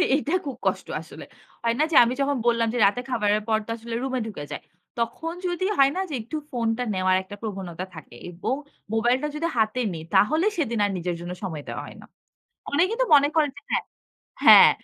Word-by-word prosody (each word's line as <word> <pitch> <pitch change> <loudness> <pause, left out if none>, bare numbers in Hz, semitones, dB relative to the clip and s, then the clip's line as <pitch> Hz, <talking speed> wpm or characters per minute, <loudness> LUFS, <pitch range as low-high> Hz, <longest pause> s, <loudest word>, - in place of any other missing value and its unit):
এইটা 295 +1 -2
খুব 275 - -4
কষ্ট - - 0
আসলে। - - -11 0.4
হয় 230 0 +1
না - - +5
যে 305 - 0
আমি 240 +1 0
যখন 280 0 +1
বললাম, 230 -1 +3
যে - - -1
রাতে 205 +5 +2
খাবারের 210 -3 +1
পর 220 -1 +3
তো - - -15
আসলে 230 0 -6
রুমে 260 -1 -1
ঢুকে 205 -9 -6
যাই। - - -5 0.4
তখন 240 +8 -2
যদি 350 +1 -1
হয় 275 0 +5
না 375 - 0
যে 300 - -6
একটু 240 +8 -5
ফোনটা 230 0 -1
নেওয়ার 185 0 +2
একটা 205 +2 -10
প্রবণতা 190 -5 -5
থাকে। 155 -5 -11 0.2
এবং 180 +9 -2 0.4
মোবাইলটা 245 +6 +2
যদি 325 +2 -1
হাতে 220 +3 +1
নিই 160 -1 -6
তাহলে 310 - +4
সেদিন 235 -9 -1
আর 205 - -1
নিজের 175 0 -2
জন্য 175 +1 -6
সময় 160 -6 -4
দেওয়া - - -4
হয় - - -12
না। - - -13 0.7
অনেকে 345 +9 +2
তো - - +4
মনে 285 0 +5
করেন 305 -2 +3
যে 285 - -10
হ্যাঁ - - +1 0.6
হ্যাঁ, - - +10
235 Hz, 205 wpm, -25 LUFS, 205-285 Hz, 0.7 s, হ্যাঁ